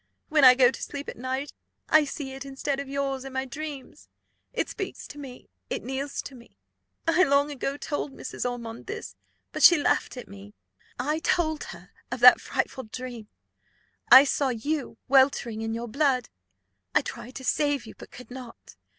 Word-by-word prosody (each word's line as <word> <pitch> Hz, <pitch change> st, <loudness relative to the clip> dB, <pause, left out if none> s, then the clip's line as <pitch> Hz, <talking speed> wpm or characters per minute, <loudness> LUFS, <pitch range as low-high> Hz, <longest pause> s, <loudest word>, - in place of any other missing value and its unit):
When 305 Hz, -2 st, +3 dB
I 255 Hz, -1 st, +10 dB
go 250 Hz, -1 st, +5 dB
to -, -, -9 dB
sleep 285 Hz, 0 st, -5 dB
at -, -, -7 dB
night, 260 Hz, +3 st, -4 dB, 0.3 s
I 310 Hz, -1 st, +5 dB
see 280 Hz, -1 st, -6 dB
it, 270 Hz, +1 st, -7 dB
instead 275 Hz, 0 st, -3 dB
of 280 Hz, -1 st, -6 dB
yours, 275 Hz, -1 st, -2 dB
in 270 Hz, -1 st, -8 dB
my 265 Hz, 0 st, -1 dB
dreams; 280 Hz, 0 st, -8 dB, 0.4 s
it -, -, -1 dB
speaks -, -, -6 dB
to 295 Hz, -, -10 dB
me, 260 Hz, -3 st, -10 dB, 0.2 s
it -, -, -3 dB
kneels 270 Hz, +3 st, -4 dB
to 275 Hz, -, -9 dB
me. 240 Hz, -2 st, -16 dB, 0.5 s
I 330 Hz, +2 st, +4 dB
long 285 Hz, -3 st, +3 dB
ago 280 Hz, 0 st, -3 dB
told 290 Hz, -1 st, -3 dB
Mrs. -, -, -6 dB
Ormond 235 Hz, +1 st, -7 dB
this, 445 Hz, +4 st, -6 dB, 0.4 s
but -, -, -5 dB
she 345 Hz, -, +9 dB
laughed 285 Hz, -, 0 dB
at 250 Hz, -, -8 dB
me. 100 Hz, +1 st, -13 dB, 0.4 s
I 300 Hz, +5 st, -1 dB
told 320 Hz, -2 st, 0 dB
her -, -, -11 dB, 0.2 s
of 255 Hz, -, -3 dB
that 250 Hz, 0 st, +9 dB
frightful 260 Hz, -3 st, -3 dB
dream. 240 Hz, -1 st, -7 dB, 0.8 s
I 265 Hz, -, +12 dB
saw 280 Hz, -1 st, 0 dB
you 260 Hz, +1 st, -3 dB
weltering 260 Hz, -4 st, +3 dB
in 225 Hz, 0 st, -2 dB
your 235 Hz, +1 st, -4 dB
blood; 260 Hz, -1 st, +1 dB, 0.7 s
I -, -, +6 dB
tried 250 Hz, +3 st, -8 dB
to 265 Hz, -, -7 dB
save 290 Hz, -2 st, +1 dB
you, 220 Hz, -, -10 dB
but -, -, -12 dB
could 250 Hz, 0 st, -13 dB
not. 250 Hz, -2 st, -11 dB
270 Hz, 185 wpm, -26 LUFS, 250-285 Hz, 0.8 s, I